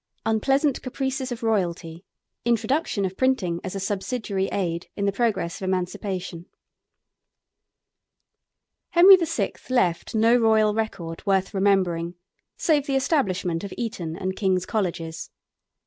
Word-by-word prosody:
UNPLEASANT 270 +6 +1
CAPRICES 265 0 -3
OF 235 -1 -5
ROYALTY: 175 -6 -1 0.4
INTRODUCTION 235 -1 0
OF 190 0 -4
PRINTING 195 -10 0
AS 185 +1 -5
A - - -2
SUBSIDIARY 195 0 -2
AID 170 -3 -2
IN 200 - -1
THE 200 - +2
PROGRESS 200 -6 -1
OF - - -3
EMANCIPATION. 185 -1 -3 2.4
Henry 370 +3 +9
VI. 340 -3 -1 0.2
left 205 -7 +1
no 225 +2 +5
royal 220 -3 +4
record 180 -7 -4
worth 195 +1 +1
remembering 185 -4 +1 0.4
save 295 -3 +2
the 275 - 0
establishment 195 - 0
of 200 - -6
Eton 175 -9 -4
and 190 +1 -3
King's 185 -3 +1
Colleges. 170 -6 -3
200 Hz, 120 wpm, -24 LUFS, 180-240 Hz, 2.4 s, Henry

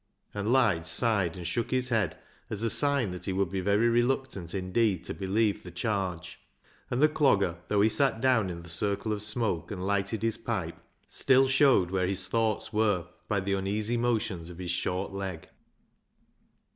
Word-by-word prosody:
And 105 +2 -2
Lige 110 -11 +3
sighed 95 -2 +2
and 90 - -7
shook 110 +7 -1
his 130 0 0
head, 110 -9 0 0.3
as 110 0 -4
a 115 - +2
sign 140 -8 +2
that 90 - -7
he 95 - -1
would 95 -1 0
be 95 -1 -2
very 100 +4 +2
reluctant 120 -6 0
indeed 95 0 0
to - - -5
believe 100 +2 0
the 90 - -10
charge. 90 -3 -3 0.5
And 125 +4 0
the - - +8
Clogger, 100 - +2
though 105 -1 +2
he 105 - +5
sat 135 -1 +1
down 125 -6 +2
in 85 -1 -7
the - - -12
circle 100 +4 -1
of 105 - -4
smoke 105 -5 +1
and 95 -3 -5
lighted 100 +2 -1
his 115 -1 0
pipe, - - -3 0.3
still 135 0 +3
showed 135 -9 +4
where 95 -1 0
his 95 -1 -2
thoughts 110 +1 -1
were 105 -5 +1 0.2
by 100 -2 0
the 100 +1 -1
uneasy 105 +4 -1
motions 110 -8 -1
of 85 - -10
his 90 -1 -4
short 90 +2 -2
leg. 95 -4 -5
100 Hz, 185 wpm, -28 LUFS, 95-115 Hz, 0.5 s, the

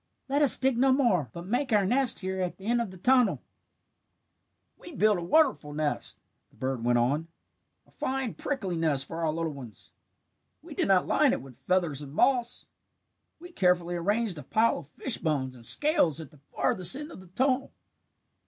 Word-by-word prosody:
'Let 280 +2 0
us 285 - +9
dig 260 -2 +1
no 265 +1 +4
more, 230 - +1
but 170 0 -9
make 250 +6 -2
our 205 -3 +3
nest 245 +3 +4
here 190 0 -3
at 180 -1 -3
the 195 - -13
end 235 +2 +1
of 230 - -4
the 185 - -12
tunnel.' 250 +4 +2 1.4
"We 345 - -13
built 210 -5 +2
a - - -6
wonderful 180 - +1
nest," 150 -1 -3 0.3
the - - -28
bird 130 -3 -4
went 120 0 +2
on, 140 +7 0 0.6
"a - - -27
fine 265 -3 -3
prickly 200 -11 -4
nest 150 -4 0
for 165 +2 -6
our 160 - +1
little 165 0 -3
ones. 120 -8 -12 0.7
We - - -10
did - - -1
not - - +3
line - - +2
it - - -3
with 135 -2 -14
feathers 170 -5 -1
and 145 0 -10
moss. 245 0 +1 0.7
We 350 +2 -13
carefully 180 - +1
arranged 200 +1 -1
a - - -9
pile 220 - +1
of 155 - -13
fish 225 - -3
bones 140 -5 -2
and 120 -2 -15
scales 175 - +3
at 155 -4 -10
the 150 - -20
farthest 180 +2 +1
end 295 +3 -7
of - - -11
the 185 - -15
tunnel. 260 +8 -1
185 Hz, 190 wpm, -27 LUFS, 155-255 Hz, 1.4 s, us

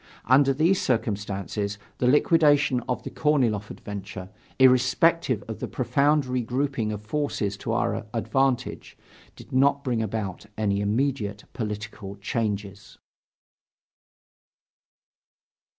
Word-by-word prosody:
Under 135 +3 +5
these 165 +8 +2
circumstances, 105 -3 -2 0.2
the 125 - +2
liquidation 145 -1 +4
of 125 - -1
the - - -6
Korniloff 120 -9 +1
adventure, 100 -1 -8 0.3
irrespective 130 0 +4
of 110 - -6
the - - -3
profound 145 +3 +2
regrouping 125 -1 -1
of 105 0 -6
forces 110 -5 -2
to - - -4
our - - -1
advantage, 125 +2 -1 0.4
did - - -14
not 140 +2 +3
bring 120 -3 0
about 105 -3 -4
any 100 -2 0
immediate 105 -1 -1
political 105 -2 -5
changes. 100 -1 -4
115 Hz, 105 wpm, -25 LUFS, 105-135 Hz, 0.4 s, Under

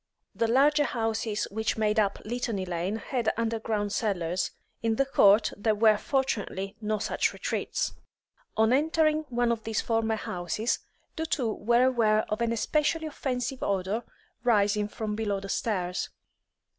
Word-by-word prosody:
The 230 - +1
larger 290 +5 +4
houses 225 -3 -1
which 220 +2 -1
made 215 0 +2
up 200 -2 +1
Litany 230 -4 -2
Lane 180 +3 -2
had 235 0 -1
underground 220 -2 -1
cellars; 185 -5 0 0.3
in 225 -1 +1
the 275 - +2
court 215 -5 +5
there 215 +1 +1
were 215 0 +5
fortunately 210 -7 -1
no 215 0 0
such 205 - 0
retreats. - - -2 0.6
On 220 +2 +4
entering 310 +2 +2
one 240 -1 +1
of 225 -2 -2
these 220 -1 -1
former 225 -1 +1
houses, 180 +3 -2 0.4
the 320 0 -2
two 250 -9 0
were 235 +3 +3
aware 225 -4 +3
of 215 +2 -2
an 235 -1 +1
especially 305 +7 +1
offensive 265 -3 -3
odour 200 +4 -1 0.4
rising 210 -3 +3
from 210 0 -4
below 205 -2 -1
the 195 0 -8
stairs. 180 -6 -1
220 Hz, 145 wpm, -28 LUFS, 205-245 Hz, 0.6 s, court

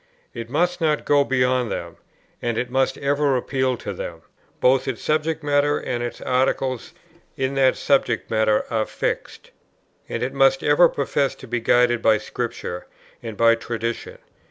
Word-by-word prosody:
It 115 -1 -7
must 175 +5 0
not 155 -2 +1
go 145 -1 +4
beyond 125 -2 +1
them, 85 -1 -5 0.4
and 120 -1 -2
it 125 0 -2
must 130 +1 +1
ever 140 -1 +1
appeal 130 0 -1
to 100 - -6
them. 85 -2 -7 0.4
Both 130 +1 +3
its 130 -4 -4
subject 155 +1 0
matter, 145 0 +2
and 120 -1 -3
its 120 - -5
articles 130 -1 -1 0.4
in 130 0 -1
that 135 -1 +3
subject 140 -1 +1
matter, 110 -1 +2
are 110 -2 0
fixed. - - -4 0.6
And - - -3
it 130 - -2
must 135 -1 +3
ever 150 +4 +5
profess 140 0 -1
to 130 - -12
be 120 +1 -1
guided 120 0 +3
by 110 -1 +4
Scripture 115 -7 -5 0.3
and 110 -3 -7
by 115 0 +5
tradition. 115 0 -4
130 Hz, 160 wpm, -22 LUFS, 115-140 Hz, 0.6 s, ever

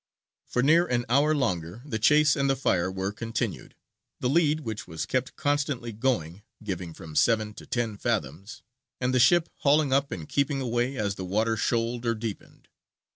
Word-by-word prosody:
For 125 - 0
near 165 +5 +5
an 120 -3 0
hour 145 +5 +3
longer 90 - -2
the 110 -7 -3
chase 150 +5 +5
and 140 0 +1
the 135 - +3
fire 95 -8 +1
were 95 +1 -2
continued; 115 0 -4 0.4
the 125 - 0
lead, 155 +1 +2
which 110 -6 -5
was 80 0 -4
kept 130 0 -2
constantly 140 -5 -1
going, 105 -7 -1 0.2
giving 90 -4 -4
from 80 -2 -10
seven 110 +5 +2
to - - -12
ten 115 -4 -2
fathoms, 100 - -3 0.4
and 125 0 0
the 130 - +3
ship 170 +6 +5
hauling 145 -1 +3
up 140 +1 +2
and 80 -4 -6
keeping 140 0 0
away 120 +1 -1
as 100 -2 -1
the 95 - -7
water 110 +5 0
shoaled 115 +2 -1
or 115 - +1
deepened. 110 -2 -7
120 Hz, 180 wpm, -27 LUFS, 105-140 Hz, 0.4 s, near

